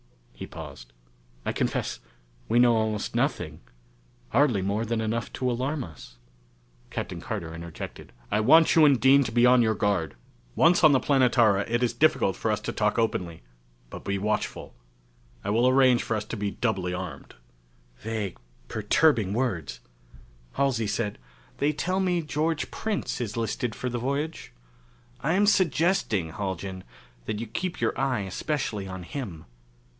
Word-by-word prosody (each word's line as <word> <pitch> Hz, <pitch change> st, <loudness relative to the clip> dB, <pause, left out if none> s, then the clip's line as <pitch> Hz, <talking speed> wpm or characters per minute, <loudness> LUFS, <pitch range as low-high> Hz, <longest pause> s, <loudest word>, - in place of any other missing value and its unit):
He -, -, -8 dB
paused. -, -, -10 dB, 0.5 s
"I -, -, 0 dB
confess, -, -, -2 dB, 0.5 s
we -, -, +2 dB
know 120 Hz, -1 st, +6 dB
almost 110 Hz, -2 st, -1 dB
nothing -, -, -1 dB, 0.7 s
hardly 125 Hz, -9 st, +3 dB
more 100 Hz, +3 st, 0 dB
than 115 Hz, 0 st, -1 dB
enough 110 Hz, 0 st, -2 dB
to 125 Hz, -1 st, -1 dB
alarm 130 Hz, +4 st, -2 dB
us." 70 Hz, -7 st, -12 dB, 0.7 s
Captain -, -, -5 dB
Carter 80 Hz, -1 st, -5 dB
interjected, 85 Hz, -1 st, -8 dB, 0.2 s
"I 105 Hz, -, +2 dB
want 160 Hz, +9 st, +6 dB
you 160 Hz, -, +7 dB
and 140 Hz, -4 st, +5 dB
Dean 135 Hz, +4 st, +6 dB
to 115 Hz, -, -3 dB
be 120 Hz, +1 st, +4 dB
on 125 Hz, 0 st, +6 dB
your 110 Hz, -1 st, +2 dB
guard. 100 Hz, -7 st, 0 dB, 0.4 s
Once 170 Hz, +2 st, +4 dB
on 155 Hz, -2 st, +8 dB
the 135 Hz, -, +4 dB
Planetara 120 Hz, -8 st, +3 dB
it 120 Hz, +1 st, +1 dB
is 120 Hz, -, +1 dB
difficult -, -, +2 dB
for -, -, -2 dB
us -, -, +1 dB
to -, -, -3 dB
talk -, -, 0 dB
openly, 90 Hz, -, -1 dB, 0.5 s
but -, -, -8 dB
be 100 Hz, 0 st, -1 dB
watchful. 105 Hz, -, -2 dB, 0.7 s
I 100 Hz, -, -1 dB
will 120 Hz, +4 st, +3 dB
arrange 130 Hz, -2 st, +5 dB
for 115 Hz, -, -2 dB
us 105 Hz, -, -4 dB
to 110 Hz, -, -5 dB
be 105 Hz, -1 st, -2 dB
doubly 95 Hz, -5 st, -1 dB
armed." 90 Hz, -, -7 dB, 0.6 s
Vague, 110 Hz, -4 st, -4 dB, 0.3 s
perturbing 115 Hz, -, +2 dB
words! 95 Hz, -, -2 dB, 0.7 s
Halsey 125 Hz, -6 st, +1 dB
said, 105 Hz, 0 st, -2 dB, 0.4 s
"They 145 Hz, +2 st, +2 dB
tell 170 Hz, +6 st, -1 dB
me 180 Hz, -3 st, +1 dB
George 155 Hz, +1 st, -1 dB
Prince 215 Hz, -, -3 dB
is 110 Hz, -2 st, -4 dB
listed 115 Hz, +1 st, -2 dB
for 125 Hz, -, -4 dB
the 120 Hz, 0 st, -3 dB
voyage. 140 Hz, -, -3 dB, 0.7 s
I 160 Hz, +4 st, 0 dB
am 200 Hz, +3 st, +4 dB
suggesting, 165 Hz, -, +2 dB
Haljan, 95 Hz, 0 st, -4 dB, 0.4 s
that 105 Hz, -, -3 dB
you 115 Hz, -, -3 dB
keep 180 Hz, -, -4 dB
your -, -, 0 dB
eye 130 Hz, -4 st, +1 dB
especially 105 Hz, -, -3 dB
on 95 Hz, -1 st, -7 dB
him. 90 Hz, -, -6 dB
115 Hz, 160 wpm, -26 LUFS, 100-140 Hz, 0.7 s, on